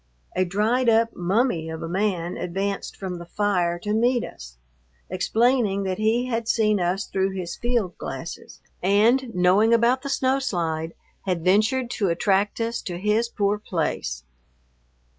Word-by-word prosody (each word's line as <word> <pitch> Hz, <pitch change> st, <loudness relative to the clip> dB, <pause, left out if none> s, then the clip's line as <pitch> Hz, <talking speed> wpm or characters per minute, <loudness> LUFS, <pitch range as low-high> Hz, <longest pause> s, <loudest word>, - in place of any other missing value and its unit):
A 185 Hz, -, +2 dB
dried 220 Hz, +7 st, +1 dB
up 230 Hz, 0 st, +3 dB
mummy 180 Hz, -2 st, 0 dB
of 160 Hz, 0 st, -6 dB
a -, -, -3 dB
man 180 Hz, -1 st, -1 dB
advanced 195 Hz, +3 st, -3 dB
from 185 Hz, -3 st, -5 dB
the 170 Hz, -, -8 dB
fire 180 Hz, -3 st, 0 dB
to 210 Hz, -, -1 dB
meet 240 Hz, +2 st, +2 dB
us, -, -, -10 dB, 0.5 s
explaining 215 Hz, +1 st, +2 dB
that 185 Hz, 0 st, -2 dB
he 225 Hz, +3 st, +2 dB
had 230 Hz, -2 st, -2 dB
seen 215 Hz, -3 st, +2 dB
us 180 Hz, +2 st, 0 dB
through 190 Hz, 0 st, -1 dB
his 175 Hz, -2 st, -4 dB
field 235 Hz, -7 st, -1 dB
glasses 135 Hz, +5 st, -7 dB, 0.2 s
and, 225 Hz, +7 st, +3 dB
knowing 190 Hz, +6 st, +4 dB
about 240 Hz, +3 st, +3 dB
the 280 Hz, -, -5 dB
snow 265 Hz, 0 st, +1 dB
slide, 165 Hz, -9 st, -2 dB, 0.3 s
had 180 Hz, -3 st, -1 dB
ventured 225 Hz, +6 st, +2 dB
to 200 Hz, -4 st, 0 dB
attract 195 Hz, +5 st, +1 dB
us 230 Hz, +1 st, -2 dB
to 175 Hz, -2 st, -5 dB
his 210 Hz, +5 st, +1 dB
poor 205 Hz, -1 st, 0 dB
place. 160 Hz, -, -3 dB
200 Hz, 155 wpm, -24 LUFS, 180-230 Hz, 0.5 s, knowing